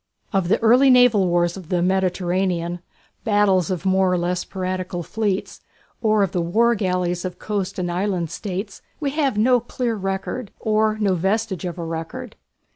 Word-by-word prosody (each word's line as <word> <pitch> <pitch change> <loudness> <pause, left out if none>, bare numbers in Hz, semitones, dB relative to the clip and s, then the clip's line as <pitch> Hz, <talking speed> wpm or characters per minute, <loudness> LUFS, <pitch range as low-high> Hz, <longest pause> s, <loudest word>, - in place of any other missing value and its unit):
Of 190 -3 +1
the 190 - +3
early 250 +4 +6
naval 245 -6 +5
wars 175 0 +1
of 185 -4 -10
the 175 -2 +1
Mediterranean 180 -1 0 0.4
battles 205 -5 +3
of 185 0 -3
more 190 -1 +3
or 180 - +2
less 175 +1 -1
piratical 185 -1 -4
fleets, 205 0 -2 0.4
or 215 -2 +3
of 190 - -1
the 180 - 0
war 225 +8 +3
galleys 180 -4 -1
of 185 -1 -5
coast 200 -3 -3
and 175 -1 -2
island 180 -2 -1
states 195 0 -5 0.2
we 285 -3 -1
have 275 -6 0
no 245 +3 +4
clear 240 0 -3
record, 195 +3 -3
or 215 0 +1
no 205 -3 +1
vestige 195 +2 -1
of 175 0 -4
a 170 - -4
record. 165 0 -6
190 Hz, 170 wpm, -22 LUFS, 180-215 Hz, 0.4 s, early